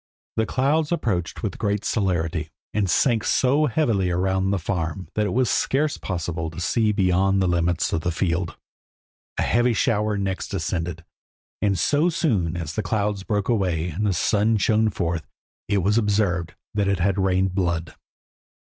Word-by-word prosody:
The 110 - +1
cloud 145 +4 +1
approached 95 - -1
with - - -3
great 105 0 -1
celerity, 85 -6 -1 0.2
and 100 -2 +1
sank 115 - +2
so 140 +4 +3
heavily 115 -9 +1
around 95 +2 +1
the 100 - +1
farm, 85 -1 -3
that 105 -1 +1
it 90 - -2
was 130 0 +2
scarce 145 +6 +1
possible 85 -3 -3
to 80 - -9
see 110 +5 +1
beyond 95 -1 +2
the 95 - +2
limits 85 -2 +1
of 80 - 0
the 90 - -1
field. 85 0 -1 0.8
A - - +1
heavy 120 0 +2
shower 105 -3 +1
next 95 -1 -2
descended, 85 -1 -3 0.6
and 100 -2 +2
so 150 - +2
soon 105 - 0
as 80 -3 -4
the 110 - -1
clouds 105 0 -1
broke 100 0 -1
away 90 -7 0
and 90 +6 -3
the - - +2
sun 105 +5 +2
shone 110 +2 +2
forth 85 -5 -2 0.4
it 100 -3 +1
was 105 +4 +3
observed 100 -5 0 0.2
that 100 -2 +1
it 100 -1 +2
had 95 +2 +1
rained 95 0 +1
blood. 85 -4 -1
95 Hz, 165 wpm, -23 LUFS, 85-110 Hz, 0.8 s, so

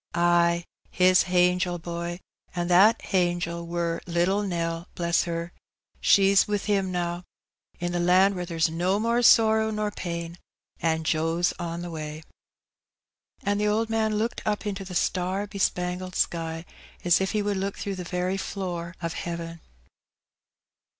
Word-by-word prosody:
"Ay, 170 0 +3 0.2
His 185 0 +4
hangel, 180 0 +2
boy. 170 +1 -5 0.4
An' 175 0 -2
that 200 +6 +6
hangel 175 -2 -1
war 170 -1 -2
little 175 +4 +1
Nell, 170 -3 -3
bless 170 -1 +1
her! 170 0 -4 0.5
she's 195 0 +5
wi' 210 0 +1
Him 195 -2 0
now, 175 0 -2 0.6
in 175 0 -2
the 175 - -1
land 185 +3 +4
where 180 -2 -4
there's 165 -2 +1
no 175 +5 0
more 235 +2 +1
sorrow 220 -2 +5
nor 210 -1 -2
pain, 170 -2 -5 0.4
an' 160 -1 +1
Joe's 165 +2 +1
on 170 0 -4
the 175 - -6
way." 155 -1 -6 1.2
And 205 +1 0
the 210 - +2
old 220 +2 0
man 220 -1 +1
looked 225 +3 -1
up 210 0 -1
into 200 -1 -3
the 185 -1 -8
star 185 +3 0
bespangled 185 -2 -2
sky, 165 0 -1 0.4
as 175 +1 +4
if 190 - -1
he 210 -1 +1
would 205 -1 -1
look 195 +1 -3
through 200 - -3
the 185 -1 -5
very 180 +2 -2
floor 175 -3 -4
of 165 0 -2
heaven. 170 -1 -5
180 Hz, 150 wpm, -26 LUFS, 170-195 Hz, 1.2 s, that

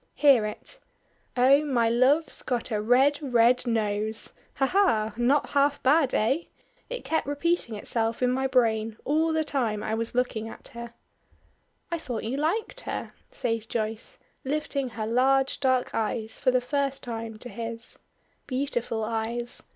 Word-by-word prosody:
Hear 270 -7 +5
it. 355 - -7 0.6
'Oh! 270 +4 +6
my 250 -6 +2
love's 260 +7 +2
got 245 -1 -2
a 210 -1 0
red, 265 +6 +4
red 250 -2 +3
nose!' 220 -1 -1 0.2
Ha! 270 - +2
ha! 260 - +2
Not 255 +5 +2
half 285 0 +2
bad, 280 0 +4
eh? 270 +10 +1 0.4
It - - -5
kept 320 - 0
repeating 290 -4 0
itself 225 +3 -2
in 250 - +3
my 265 +1 +1
brain 225 -4 +1
all 315 +3 +2
the 315 0 +1
time 235 -8 -1
I 215 - -2
was 230 +1 -2
looking 230 -3 -1
at - - -11
her." 235 0 -9 1.0
"I 335 - -1
thought 245 -7 -4
you 230 +4 -2
liked 420 - -1
her," - - -5 0.2
says 225 -2 -2
Joyce, 220 0 -4 0.3
lifting 280 -1 -2
her 225 -2 -4
large 265 +4 +2
dark 260 -2 +1
eyes 220 0 -2
for - - +2
the 255 0 +3
first 275 +1 -1
time 225 -2 -5
to 245 - -7
his. 230 +1 -6 0.5
Beautiful 255 -4 -2
eyes! 230 +2 -2
245 Hz, 155 wpm, -27 LUFS, 225-280 Hz, 1.0 s, Oh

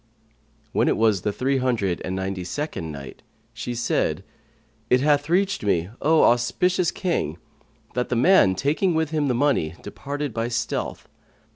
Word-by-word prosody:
When - - +2
it - - +2
was 110 -4 +3
the 105 - -1
Three 135 +5 0
Hundred 110 -9 0
and 95 - -3
Ninety 95 -1 -3
second 90 - -4
Night, 70 -2 -9 0.3
She 120 - -5
said, 95 -7 0 0.7
It 125 - +5
hath 145 +1 +2
reached 195 - +1
me, 90 -2 0
O 160 +1 +4
auspicious 175 +9 +2
King, 165 - -2 0.6
that 125 +1 -1
the 125 - 0
man, 125 - +5
taking 155 - +1
with 160 -1 0
him 150 -2 0
the 125 - +1
money, 120 - +1
departed 145 -2 -5
by 115 +1 -1
stealth. 120 0 -3
125 Hz, 155 wpm, -24 LUFS, 95-150 Hz, 0.7 s, It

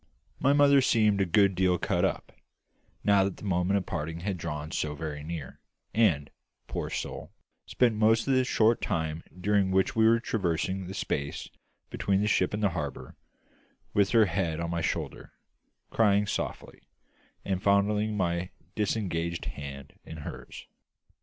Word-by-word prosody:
My 135 - +3
mother 140 -1 +6
seemed 105 -5 +3
a 95 - +1
good 100 +2 +4
deal 90 0 +2
cut - - 0
up, - - -1 0.7
now 100 -1 +4
that 95 -1 -2
the - - -13
moment 95 0 +1
of 95 - -2
parting 80 +2 -4
had 100 +1 -2
drawn 80 -2 -5
so 75 -1 -2
very 75 -1 -5
near, 80 -4 -7 0.3
and 90 -10 +2 0.3
poor - - -4
soul - - -5 0.4
spent 125 -2 +2
most 110 +2 +3
of 135 - +3
the 130 0 +4
short 115 -2 +2
time 80 -4 -2 0.2
during 100 0 +2
which 95 0 +1
we 110 0 +5
were 115 +1 +5
traversing 95 -3 -1
the 95 - -7
space 70 -6 -3 0.4
between 95 -1 0
the 105 - +1
ship 95 -3 +2
and 105 +1 -3
the 100 - +4
harbour, 75 -6 -5 0.8
with 100 -1 +3
her 115 -2 +5
head 85 -3 -1
on 85 0 -3
my 85 -1 -1
shoulder, - - -4 0.6
crying 105 -2 +3
softly, - - -4 0.7
and 95 -2 -1
fondling 105 +2 +2
my 85 -1 -1 0.2
disengaged 85 -6 -2
hand 70 -1 -7
in 80 - -9
hers. - - -9
95 Hz, 160 wpm, -28 LUFS, 85-105 Hz, 0.8 s, mother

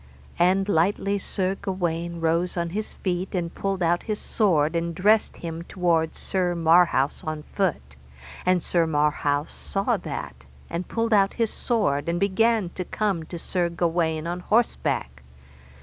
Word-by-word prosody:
And 190 +3 +3
lightly 200 +2 +1
Sir 190 0 -1
Gawaine 170 -3 -3
rose 170 +3 +1
on 170 -1 -1
his 215 +3 -3
feet, 185 0 -3
and 170 -2 -2
pulled 195 -2 -2
out 170 +1 +2
his 215 -2 -3
sword, 165 -7 +1
and 170 0 -1
dressed 210 +5 +3
him 165 -1 -5
toward 170 -2 0
Sir 180 -2 -1
Marhaus 165 -4 +3
on 155 -1 -4
foot, 150 - -2 0.5
and 185 -1 +2
Sir 170 -2 +1
Marhaus 150 -1 0
saw 200 +4 -1
that, 75 - -6 0.3
and 170 +2 -3
pulled 230 0 0
out 195 -1 +3
his 230 -2 0
sword 170 - 0
and 170 +1 0
began 205 0 +2
to 185 - -5
come 195 -2 -1
to 170 - -7
Sir 175 +1 -1
Gawaine 165 -2 0
on 175 +1 -3
horseback. 180 - 0
175 Hz, 150 wpm, -25 LUFS, 165-195 Hz, 0.5 s, And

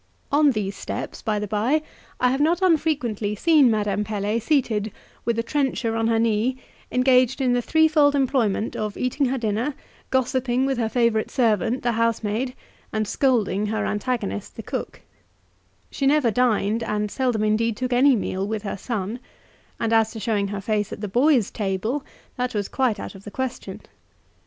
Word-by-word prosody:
On 290 +1 +5
these 205 -5 -2
steps, - - -5
by 215 -1 -1
the 210 - -2
by, 225 +10 +1 0.4
I 250 0 +3
have 270 +2 0
not 330 +3 +3
unfrequently 275 - +1
seen 300 +1 +5
Madame 210 -2 0
Pelet 210 +1 -2
seated 220 -6 0 0.3
with 235 -1 0
a 230 - 0
trencher 255 -3 -1
on 225 0 +1
her 230 0 +2
knee, 230 +3 +1 0.3
engaged 255 0 +3
in 255 -2 +2
the 245 - +2
threefold 305 0 +4
employment 245 -6 +1
of 210 -1 -3
eating 255 +2 0
her 265 +2 -1
dinner, 230 +4 -1 0.3
gossiping 260 0 +1
with 270 -2 -1
her 225 -2 0
favourite 235 -2 +1
servant, 230 -1 +1
the 240 - +2
housemaid, 230 +2 -1 0.4
and 215 -1 -1
scolding 210 -6 +1
her 220 +1 -1
antagonist, 210 -2 -3
the - - -7
cook; - - -5 0.9
she 275 - 0
never 280 -5 +3
dined, 225 -2 +1
and 210 -2 -2
seldom 250 -5 0
indeed 215 +1 +1
took 255 -1 -2
any 265 +2 +5
meal 195 -2 -2
with 220 -1 -3
her 200 - -4
son; 215 +1 -4 0.6
and 230 0 0
as 225 -1 +4
to 225 - -6
showing 205 -2 0
her 200 0 -4
face 210 0 -1
at - - -7
the 210 - -2
boys' 250 +2 +3
table, 215 +7 -2 0.3
that 250 -1 -2
was 205 -1 -1
quite 250 -6 0
out - - -6
of 195 -1 -13
the 205 - -8
question. 260 +3 -5
230 Hz, 175 wpm, -23 LUFS, 210-260 Hz, 0.9 s, On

